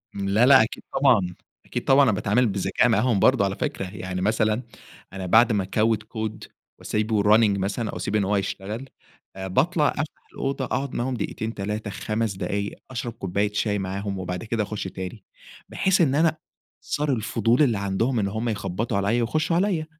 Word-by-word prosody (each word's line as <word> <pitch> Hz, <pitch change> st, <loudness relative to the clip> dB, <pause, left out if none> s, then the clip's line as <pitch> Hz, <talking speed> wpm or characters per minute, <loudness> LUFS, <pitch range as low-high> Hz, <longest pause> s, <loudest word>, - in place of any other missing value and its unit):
امم، 100 Hz, -1 st, -2 dB
لا، 110 Hz, +5 st, +4 dB
لا، 135 Hz, -3 st, +8 dB
أكيد 110 Hz, -, -6 dB
طبعًا. 110 Hz, -10 st, +3 dB, 0.3 s
أكيد -, -, -4 dB
طبعًا 135 Hz, +1 st, +5 dB
أنا 125 Hz, -, +4 dB
باتعامل 105 Hz, +4 st, +2 dB
بذكاء 100 Hz, +4 st, +1 dB
معاهم 115 Hz, -1 st, +2 dB
برضه 100 Hz, -, +4 dB
على 95 Hz, 0 st, -2 dB
فكرة 95 Hz, -, -3 dB
يعني 90 Hz, 0 st, -5 dB
مثلًا، 110 Hz, +3 st, +1 dB, 0.5 s
أنا 95 Hz, -1 st, -5 dB
بعد 110 Hz, +6 st, +5 dB
ما 100 Hz, -3 st, +1 dB
أكود 110 Hz, +3 st, +1 dB
كود 110 Hz, 0 st, -5 dB, 0.4 s
وأسيبه 105 Hz, -1 st, 0 dB
يrunning 105 Hz, -1 st, +4 dB
مثلًا، 105 Hz, +4 st, -2 dB
أو -, -, -6 dB
أسيب 95 Hz, +4 st, -3 dB
إن 105 Hz, -, +3 dB
هو 100 Hz, +2 st, +1 dB
يشتغل، 100 Hz, +6 st, -4 dB, 0.5 s
آآ 95 Hz, 0 st, -5 dB
باطلع، 150 Hz, -, +2 dB
أفتح 155 Hz, +1 st, -5 dB
الأوضة، 135 Hz, -1 st, -2 dB
أقعد 135 Hz, +1 st, -3 dB
معاهم 130 Hz, +2 st, -1 dB
دقيقتين، 110 Hz, -1 st, -4 dB
3، 105 Hz, +1 st, -4 dB
5 110 Hz, 0 st, -2 dB
دقايق 100 Hz, +1 st, -3 dB, 0.2 s
أشرب 120 Hz, -2 st, -4 dB
كوباية 100 Hz, -1 st, -2 dB
شاي 105 Hz, -1 st, 0 dB
معاهُم، 100 Hz, +1 st, -3 dB
وبعد 90 Hz, +1 st, -4 dB
كده 115 Hz, -1 st, -1 dB
أخُش 105 Hz, 0 st, -4 dB
تاني. 95 Hz, +2 st, -7 dB, 0.5 s
بحيث 190 Hz, -1 st, +2 dB
إن 140 Hz, -5 st, +3 dB
أنا 160 Hz, +1 st, +3 dB, 0.4 s
صار 150 Hz, 0 st, -2 dB
الفضول 115 Hz, +2 st, +1 dB
اللي 120 Hz, -7 st, +3 dB
عندهم 100 Hz, +6 st, 0 dB
إن 100 Hz, -, 0 dB
هُم 110 Hz, +4 st, -2 dB
يخبطوا 100 Hz, 0 st, -2 dB
عليَّ 105 Hz, +5 st, +1 dB
ويخشوا 155 Hz, +8 st, 0 dB
عليِّ. 175 Hz, -3 st, +1 dB
110 Hz, 180 wpm, -24 LUFS, 100-125 Hz, 0.5 s, لا